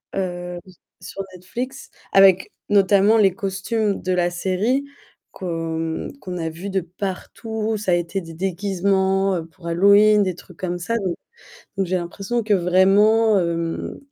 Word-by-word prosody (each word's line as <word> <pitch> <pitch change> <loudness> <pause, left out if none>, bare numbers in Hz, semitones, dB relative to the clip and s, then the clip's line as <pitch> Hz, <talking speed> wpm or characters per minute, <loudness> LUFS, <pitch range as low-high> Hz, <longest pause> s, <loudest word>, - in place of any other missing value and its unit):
Heu, 175 -2 -3
s 185 - -16 0.3
sur 185 +2 -7
Netflix, 245 +9 -6 0.2
avec 190 -1 +5 0.2
notamment 200 +2 +4
les 195 -4 +4
costumes 200 +2 -2
de 185 - -1
la 175 -1 +2
série 195 +10 0 0.5
qu'on 165 -3 -3
qu'on 180 -1 -5
a 165 -1 -3
vus 170 +5 -7
de 195 0 0
partout. 210 +5 -4
Ça 205 -3 -1
a - - +5
été 175 +3 -2
des 165 -1 -10
déguisements, 195 +1 0
heu, 165 -2 -3
pour 170 +1 -13
Halloween, 200 +4 +5
des 185 -2 -1
trucs 180 0 -15
comme 175 -1 -3
ça. 230 +7 -2
Donc 180 -3 -2 0.6
donc 195 -1 0
j'ai 185 +1 0
l'impression 195 +7 -3
que 210 -1 +3
vraiment, 200 +4 +4
hem, 170 -1 -3
190 Hz, 155 wpm, -22 LUFS, 175-200 Hz, 0.6 s, avec